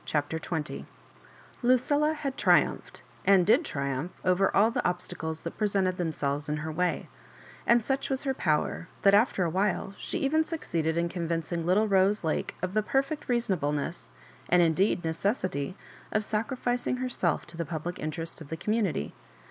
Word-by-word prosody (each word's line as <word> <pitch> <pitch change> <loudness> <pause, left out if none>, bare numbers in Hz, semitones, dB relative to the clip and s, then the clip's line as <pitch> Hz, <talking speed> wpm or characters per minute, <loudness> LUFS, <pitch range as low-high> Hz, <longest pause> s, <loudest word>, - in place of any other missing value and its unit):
CHAPTER 150 +2 -1
XX 160 -2 -4 0.8
LuciLLA 285 +5 +3
had 275 -3 -3
triumphed, - - +2 0.2
and 195 -3 +5
did 235 - +5
triumph, 140 - -3
over 185 +1 +3
all 215 +3 +5
the 250 +1 0
obstades 170 -3 -3
that 165 - -6
presented 195 -3 +1
themselves 145 -4 -2
in 150 - 0
her 160 +1 -4
way; 180 +3 -1 0.6
and 235 -1 +4
such 270 0 -1
was 270 -1 -1
her 270 -2 0
power, 160 -3 0 0.2
that 195 - +6
after 205 -2 +4
a 170 - +1
while 195 +1 0
she - - -3
even 315 +3 +2
succeeded 165 - -2
in 170 0 +2
convincing 170 -1 -2
little 205 +5 +4
Rose 195 +1 +3
Lake 160 - -1
of 185 0 -1
the 215 - +3
perfect 275 +6 -1
reasonableness, 170 - -1 0.3
and 175 0 +5
indeed 170 +2 +2
necessity, 185 - -1 0.3
of 215 - +1
sacrificing 245 +3 -1
herself 250 -8 0
to 170 - -12
the 170 - -2
public 165 +3 -5
in 155 - -2
terests 165 +2 -6
of 150 - -10
the 160 - -4
community. 205 - -1
185 Hz, 165 wpm, -28 LUFS, 160-225 Hz, 0.8 s, that